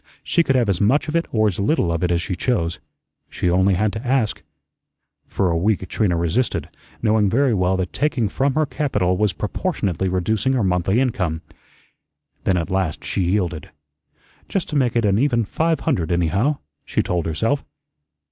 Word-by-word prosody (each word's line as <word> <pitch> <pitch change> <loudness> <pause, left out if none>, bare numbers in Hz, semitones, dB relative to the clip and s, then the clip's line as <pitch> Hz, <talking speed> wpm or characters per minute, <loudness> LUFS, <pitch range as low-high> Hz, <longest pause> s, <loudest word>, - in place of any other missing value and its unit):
She 170 - +2
could 135 -5 +1
have 120 -3 +3
as 95 -4 0
much 130 +11 +3
of 155 - -3
it 170 - +1
or 110 -2 +2
as 100 -3 -2
little 100 - +1
of 85 +1 -1
it 90 - +2
as 85 0 +1
she 90 - -3
chose. 85 -7 -1 0.5
She 90 - -1
only 95 +2 +3
had 105 +3 0
to 110 +2 -5
ask. 125 -4 0 0.9
For 95 -3 0
a - - 0
week 95 +2 0
Trina 95 -6 0
resisted, 85 +10 -1 0.3
knowing 105 -2 +3
very 130 +3 +2
well 95 -1 +1
that 95 -1 -3
taking 135 -6 0
from 135 +6 0
her 155 0 +3
capital 105 - 0
was 105 +1 +1
proportionately 100 - -2
reducing 100 +7 0
her 125 -4 +1
monthly 95 +3 +1
income. 90 -11 -1 1.0
Then 95 - +2
at 85 +2 -3
last 95 -5 -1
she - - -2
yielded. 90 -3 -1 0.8
"Just 195 -4 -2
to - - -4
make 125 -5 +2
it 115 -2 +2
an 100 0 +3
even 120 -4 +2
five 160 +8 0
hundred, 90 - 0
anyhow," 95 - +1 0.3
she - - -1
told 85 -2 -1
herself. 115 - 0
100 Hz, 185 wpm, -21 LUFS, 90-130 Hz, 1.0 s, have